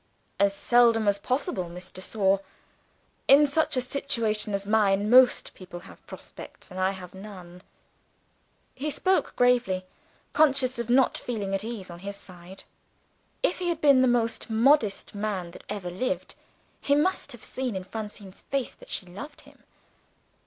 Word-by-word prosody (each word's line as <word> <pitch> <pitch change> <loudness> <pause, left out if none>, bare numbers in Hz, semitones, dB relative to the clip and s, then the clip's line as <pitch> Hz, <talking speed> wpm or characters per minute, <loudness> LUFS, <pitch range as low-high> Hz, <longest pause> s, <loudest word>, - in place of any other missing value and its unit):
"As 200 0 +3
seldom 230 -1 +4
as 200 0 +3
possible, 230 - -2
Miss 180 +2 -8
de 185 - -9
Sor. 195 -1 +1 0.9
In 285 +2 +7
such 290 -1 +1
a - - +3
situation 230 -5 -1
as 200 0 -3
mine, 205 0 +2
most 255 0 +5
people 175 -2 -10
have - - -15
prospects - - -11
I 185 +1 0
have 185 -2 -8
none." 185 -3 -11 1.1
He 290 +4 -3
spoke 375 +5 0
gravely, 245 -7 +2 0.5
conscious 270 -4 +3
of 235 0 -4
not 255 +1 +3
feeling 205 -5 -4
at 195 +1 0
ease 215 -6 -6
on 170 - -10
his 200 +2 -6
side. 185 -1 -12 0.8
If - - +1
he 355 -1 -1
had 335 -2 -1
been 280 -4 +5
the 260 - +4
most 235 -1 0
modest 225 -1 +2
man 200 -4 -3
that - - -13
ever 195 -4 -4
lived, 250 +9 -3 0.5
he 285 - +2
must 300 -1 0
have 240 - -11
seen 255 -5 -3
in 190 - -4
Francine's 205 -1 -8
face 275 -2 -1
that - - -17
she - - -4
loved 240 - -10
him. - - -20
215 Hz, 160 wpm, -27 LUFS, 190-255 Hz, 1.1 s, In